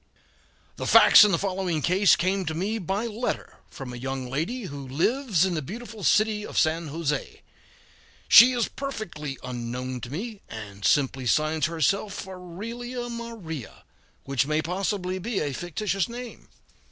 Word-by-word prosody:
] - - -34 0.3
The - - -4
facts - - +9
in 210 - +4
the 180 - +3
following 185 -4 -2
case 185 +2 +5
came 185 +3 0
to 160 -1 -3
me 205 +7 -1
by 195 +4 -2
letter 230 +2 -4
from 130 -2 -8
a - - -6
young 130 0 -4
lady 205 - -2
who 140 -6 -7
lives 190 - +1
in 185 - -1
the 155 - -1
beautiful 220 - -8
city 215 +6 +3
of - - -7
San 160 +1 +2
Jose; 150 0 -3 0.8
she 245 +2 +9
is 240 -2 +1
perfectly 170 - -6
unknown 125 +1 -5
to 120 - -7
me, 205 - -6
and 100 -3 -9
simply 135 -1 +2
signs 155 +5 +2
herself 195 +5 -1
"Aurelia 230 +7 -6
Maria," 225 - -7 0.4
which 140 0 0
may 155 +1 +1
possibly 185 +2 -2
be 210 +2 -2
a 145 -2 -2
fictitious 190 - -2
name. 240 0 -9
180 Hz, 155 wpm, -26 LUFS, 145-215 Hz, 0.8 s, facts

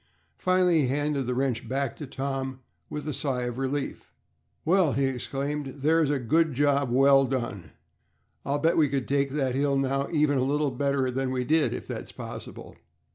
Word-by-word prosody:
Finally 180 -3 +3
he 135 - +1
handed 145 0 -1
the 125 - -1
wrench 125 -4 -1
back 135 -1 -1
to 150 - -7
Tom 135 -1 -4 0.3
with 150 0 -5
a 150 - -2
sigh 130 -3 -1
of 120 +1 -4
relief. 135 +1 -3 0.5
"Well!" 175 -3 +3
he 140 - +1
exclaimed. 135 +2 -3
"There's 160 0 +3
a 145 - +1
good 150 +4 +1
job 140 -1 +2
well 135 +2 +5
done. 120 - -3 0.7
I'll 140 +2 0
bet 160 +3 +2
we 150 -3 +4
could 135 -1 -2
take 140 0 +1
that 135 -2 -1
hill 140 +1 +1
now 135 +1 0
even 150 -4 +2
a - - +2
little 145 +1 +1
better 135 0 0
than 135 +1 -1
we 130 -1 -1
did, 155 +4 +2
if - - -5
that's - - -6
possible." - - -9
140 Hz, 185 wpm, -27 LUFS, 130-145 Hz, 0.7 s, well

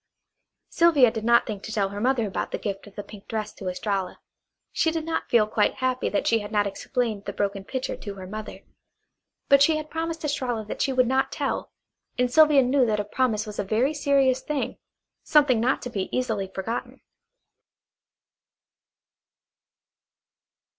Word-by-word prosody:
Sylvia 305 -9 +5
did 220 -2 -5
not 235 +1 +4
think 210 -4 -5
to 220 - -7
tell 200 -3 0
her 200 +1 -6
mother 250 -1 +2
about 195 - -3
the - - -3
gift 200 -1 -5
of 200 - -15
the 205 - -5
pink 205 -1 -13
dress 215 -1 -4
to 190 - -5
Estralla. 195 0 -3 0.5
She 325 - +1
did 320 -1 -3
not 330 - -3
feel 230 -3 +5
quite 210 0 +1
happy 255 -1 -1
that 205 - -1
she 230 - +3
had 205 0 -7
not 205 -2 +2
explained 215 +1 -2
the - - -3
broken 200 -1 -2
pitcher 260 +5 -4
to 205 -2 -8
her 190 -1 -8
mother; 215 +3 -7 0.9
but 280 0 +6
she 310 +2 +5
had 310 0 -7
promised 325 0 -3
Estralla 245 -6 -2
that - - -5
she 270 - +1
would 255 -1 +3
not 265 +2 +1
tell, - - -3 0.5
and 250 0 +1
Sylvia 300 -3 +6
knew 260 +2 +3
that 210 -1 0
a 205 - -2
promise 220 -1 0
was 210 -1 -8
a - - +1
very 225 +9 +1
serious 275 -3 +2
thing, 300 -3 -3 0.4
something 285 -6 +4
not 250 +4 +1
to 245 - -5
be 195 -4 -3
easily 220 -6 -1
forgotten. 190 +5 -5
235 Hz, 175 wpm, -25 LUFS, 205-270 Hz, 0.9 s, but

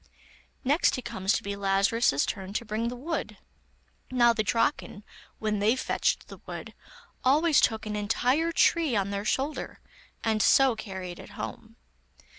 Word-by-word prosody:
Next 285 +2 +2
it 255 - -6
comes 195 -5 -1
to - - -1
be 200 0 -3
Lazarus's 195 - +2
turn 195 0 -5
to 235 - -2
bring 220 +2 -2
the 245 - -4
wood. 315 +7 -4 0.7
Now 240 -2 +4
the 225 - 0
Draken, 215 -1 -1 0.3
when 215 -1 -1
they 215 +4 +3
fetched 260 - 0
the - - -11
wood, - - -7 0.5
always 295 +3 +4
took 220 -2 +1
an 210 0 -3
entire 250 +10 +1
tree 325 -5 +3
on 200 -1 0
their 200 +1 -3
shoulder, 275 +7 -2 0.4
and 220 -1 +1
so 265 +1 +5
carried 190 -4 -7
it - - -11
home. - - -7
225 Hz, 155 wpm, -27 LUFS, 200-255 Hz, 0.7 s, so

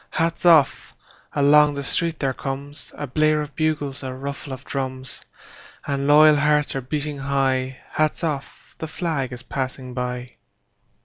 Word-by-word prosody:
Hats 165 +1 0
off! 160 -5 +4 0.4
Along 145 0 +5
the 140 - -4
street 165 +2 0
there 135 -2 0
comesA 140 +2 -6
blare 155 0 +3
of 150 -1 -10
bugles, 150 -3 -1
a 130 -1 -5
ruffle 140 +2 -6
of 130 +1 -7
drums; 130 -1 -5 0.6
And 140 -1 -1
loyal 150 +1 +7
hearts 150 0 +2
are 135 - -1
beating 145 +2 -3
high:Hats 135 +3 -1
off! 145 -4 -5
The 160 - -4
flag 155 -5 -2
is 125 0 -8
passing 130 -1 -4
by! 125 0 -4
140 Hz, 140 wpm, -23 LUFS, 130-150 Hz, 0.6 s, loyal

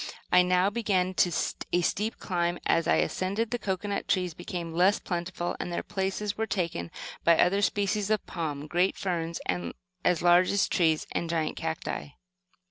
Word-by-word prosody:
I 180 - +7
now 180 +2 +3
began 200 -5 +1
a 175 +1 +1
steep 215 +6 -1
climb. 175 -2 -1
As 165 - +2
I - - +4
ascended, 200 +5 0
the 245 - -1
cocoanut 200 0 -2
trees 180 -3 +1
became 170 0 -5
less 185 +4 +4
plentiful, 175 0 -3
and 180 - -4
their 170 - -2
places 195 +1 -2
were 220 0 -2
taken 170 - -2 0.3
by 170 -1 +5
other 195 +3 +3
species 205 0 +1
of 215 -2 +1
palm, 150 -4 -4
great 175 +4 +1
ferns 170 -4 -2 0.6
as 180 -2 +2
large 175 +1 +6
as 200 0 +2
trees, 160 -4 +2
and 170 - -2
giant 160 -2 -1
cacti. 75 -3 -4
180 Hz, 160 wpm, -28 LUFS, 170-200 Hz, 0.6 s, I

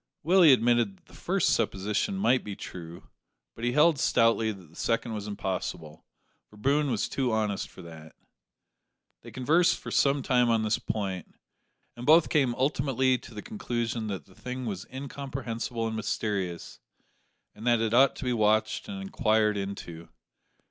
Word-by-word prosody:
Willie 175 -1 +6
admitted 120 -5 +3
that - - -32
the - - -20
first - - 0
supposition 105 - 0
might 130 -9 +2
be 105 -1 -6
true, 85 -2 -9 0.4
but 115 - -11
he 120 0 +1
held 150 +1 +4
stoutly 115 -3 +3
that 95 -6 -12
the - - -20
second 115 0 -1
was 105 -1 -5
impossible, 90 -6 -5 0.4
for 105 - -17
Boone 140 +6 +1
was 115 -5 0
too 130 -3 -1
honest 105 -2 -1
for - - -13
that. 80 -2 -12 1.1
They - - -11
conversed 160 +7 +2
for - - -8
some 140 -1 +2
time 125 -2 +3
on 115 -1 +2
this 110 0 +1
point, 95 -5 -4 0.6
and 120 - -9
both 160 +1 +6
came 135 -5 +2
ultimately 130 -1 +1
to 115 - -13
the 105 - -7
conclusion 120 - -3
that 100 -3 -5
the 95 - -20
thing 125 +5 -6
was 100 -4 -5
incomprehensible 130 -4 -4
and 110 0 -3
mysterious, 100 -5 -3 0.7
and 110 +3 -8
that 120 -1 +4
it 110 0 0
ought 130 +2 +5
to - - -7
be 125 - +1
watched 110 - +1
and 200 -1 -5
inquired 110 - +1
into. 95 -4 -6
115 Hz, 165 wpm, -28 LUFS, 105-130 Hz, 1.1 s, Willie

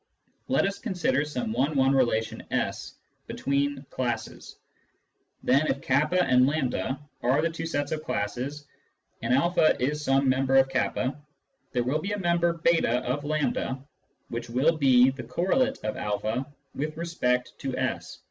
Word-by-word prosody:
Let 260 - +2
us 195 0 -2
consider 185 - 0
some 125 -7 -3
one 140 +6 0
one 135 0 +4
relation 120 -4 +1
S - - -2 0.3
between 140 +1 0
the 135 - -10
classes. 120 -4 -4 0.9
Then 140 +4 +3
if 140 - 0
k 135 - -2
and 140 -3 +3
A 130 +1 -2 0.2
are 130 +4 +2
the 165 - +1
two 165 0 -4
sets 145 -3 -2
of 155 -1 -2
classes, 130 +7 -3 0.6
and - - -1
a 155 +5 +4
is 150 +4 -1
some 135 0 +2
member 130 +1 +2
of 135 0 +5
k, 130 0 +1 0.8
there 120 - +1
will 140 +6 0
be 200 +4 -3
a - - -1
member 170 -2 +1
/2 165 -8 +2
of 130 +4 -2
A 145 -3 -1 0.5
which 120 0 -5
will 135 +8 +2
be 130 -3 +5
the 130 -1 -7
correlate 190 - +1
of 110 - -2
a 110 +5 -2 0.3
with 155 +2 -4
respect 125 -7 0
to 135 -2 -3
S. 130 0 -3
135 Hz, 155 wpm, -27 LUFS, 125-155 Hz, 0.9 s, of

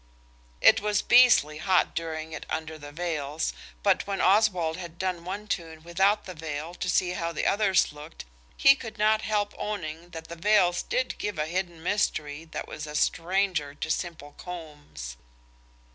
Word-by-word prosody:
It - - +7
was 210 -1 +1
beastly 240 - +6
hot 185 +2 +2
doing 160 -1 -4
it - - -7
under 160 0 -4
the 145 0 -9
veils, 150 - -2 0.3
but - - +2
when 195 -1 -2
Oswald 185 -5 +3
had 170 -2 -8
done 180 -2 -2
one 200 +3 -5
tune 165 -5 -4
without 190 +5 +2
the 185 - -7
veil 155 0 -5
to 180 - -4
see 180 0 +2
how 170 -2 -2
the 165 - -3
others 195 -5 +3
looked 150 - -10 0.3
he 275 - +8
could 225 -5 -8
not 215 +1 +3
help 210 -2 -1
owning 170 -5 -4
that 160 -1 -8
the 170 - -7
veils 180 -1 +3
did 255 0 -2
give 205 -4 -3
a 150 - 0
hidden 175 -1 -3
mystery 155 -6 -1
that 160 - -6
was 155 0 -7
a 150 - -7
stranger 170 -4 0
to 160 - -3
simple 160 -5 -4
cornbs. 150 - -8
170 Hz, 170 wpm, -27 LUFS, 155-195 Hz, 0.3 s, he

